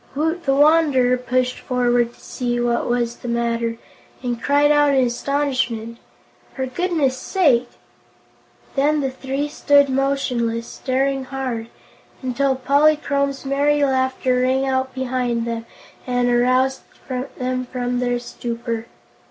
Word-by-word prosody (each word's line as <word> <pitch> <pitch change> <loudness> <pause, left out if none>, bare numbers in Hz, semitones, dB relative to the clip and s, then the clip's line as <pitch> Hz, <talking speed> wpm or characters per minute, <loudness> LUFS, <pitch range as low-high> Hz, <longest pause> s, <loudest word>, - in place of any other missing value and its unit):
Woot 320 +4 -1
the 270 - +2
Wanderer 290 -4 +4
pushed 250 0 -1
forward 245 -1 +1
to - - -23
see 240 -1 -3
what 240 0 0
was 240 -1 0
the - - -9
matter, 235 -1 -1 0.5
and 240 -2 -3
cried 290 +1 +3
out 290 -1 +4
in 260 -1 +4
astonishment: 240 -3 -1 0.6
"For 265 - -2
goodness' 285 -2 0
sake!" 260 -9 +2 1.1
Then 295 +2 +2
the 270 -1 -1
three 270 +2 -3
stood 285 -1 +3
motionless, 255 -4 0
staring 270 +1 -1
hard, 255 -4 -4 0.6
until 265 +1 +1
Polychrome's 280 0 +1
merry 285 +1 +2
laughter 260 -1 +1
rang 260 +1 +2
out 260 0 0
behind 250 -3 -1
them 230 0 -4 0.4
and 245 -1 +1
aroused 255 +2 +2 0.6
them 255 0 -2
from 245 -1 -2
their 245 -1 0
stupor. 235 -1 -5
260 Hz, 125 wpm, -21 LUFS, 240-275 Hz, 1.1 s, Wanderer